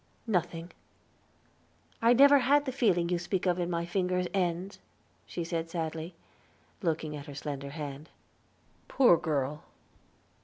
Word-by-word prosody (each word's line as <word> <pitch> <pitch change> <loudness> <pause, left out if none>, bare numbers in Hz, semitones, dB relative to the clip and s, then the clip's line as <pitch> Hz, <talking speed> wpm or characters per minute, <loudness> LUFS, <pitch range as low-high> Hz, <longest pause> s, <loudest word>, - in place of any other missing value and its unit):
"Nothing." 175 -5 -2 1.3
"I 230 +1 +6
never 280 +3 +7
had 285 +3 +3
the 260 - -2
feeling 195 -10 +2
you 175 -1 0
speak 180 +2 -2
of 180 -1 +1
in 175 0 -1
my 170 -1 -1
finger 180 0 0
ends," 185 0 -1 0.5
she 175 - -4
said 165 -1 -3
sadly, 165 0 -4 0.7
looking 160 -4 -1
at 145 +1 -8
her 145 - -8
slender 140 -1 -5
hand. 145 0 -7 0.8
"Poor 250 -10 +5
girl!" 150 -2 -2
170 Hz, 130 wpm, -30 LUFS, 160-190 Hz, 1.3 s, never